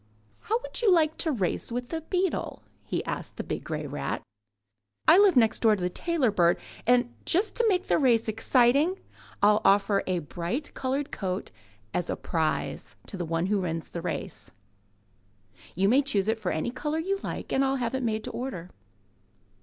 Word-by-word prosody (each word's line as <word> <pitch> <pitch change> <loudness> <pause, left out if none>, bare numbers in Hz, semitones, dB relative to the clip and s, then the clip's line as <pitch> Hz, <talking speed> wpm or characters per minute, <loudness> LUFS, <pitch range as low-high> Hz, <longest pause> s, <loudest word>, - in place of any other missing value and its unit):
How 450 +3 -1
would - - -3
you 440 -5 +4
like 320 -3 +3
to 320 - 0
race 205 - -1
with 245 +1 -3
the 325 -1 -3
beetle?'' 365 +2 -2 0.2
he - - -3
asked - - -4
the - - -3
big - - -4
grey 155 -2 -4
rat. 145 +1 -4 0.8
'1 345 +5 +8
live 400 -4 +5
next 225 -3 +4
door 220 -2 +4
to 195 - -7
the 180 - 0
tailor 320 - 0
bird,'* 175 -3 +3
he - - -16
added, 250 0 +5
'*and 240 - -21
just 395 +5 +1
to 475 - +2
make 370 -2 +1
the - - +2
race 235 -6 +3
exciting 250 - +3 0.5
Til 210 +1 +5
offer 200 0 +4
a 185 -1 +1
bright 175 - -4
coloured 270 +2 -2
coat 185 -1 -3 0.4
as 175 -1 -1
a - - 0
prize 160 -2 -2
to - - -8
the 180 -2 -3
one 165 +1 -1
who 205 +1 +1
wins 165 -2 -3
the 170 - -5
race. 180 0 -5 1.3
You 190 +3 +2
may 255 +7 +5
choose 215 -9 +1
for 215 -5 -2
it - - -1
any 160 +9 -2
colour 295 +4 -3
you 390 +5 -1
like - - -5
and 270 - +3
I'll 270 0 +1
have 245 -2 -2
it 265 - -1
made 220 -3 -1
to - - -5
order." 190 -9 -5
235 Hz, 195 wpm, -27 LUFS, 185-300 Hz, 1.3 s, 1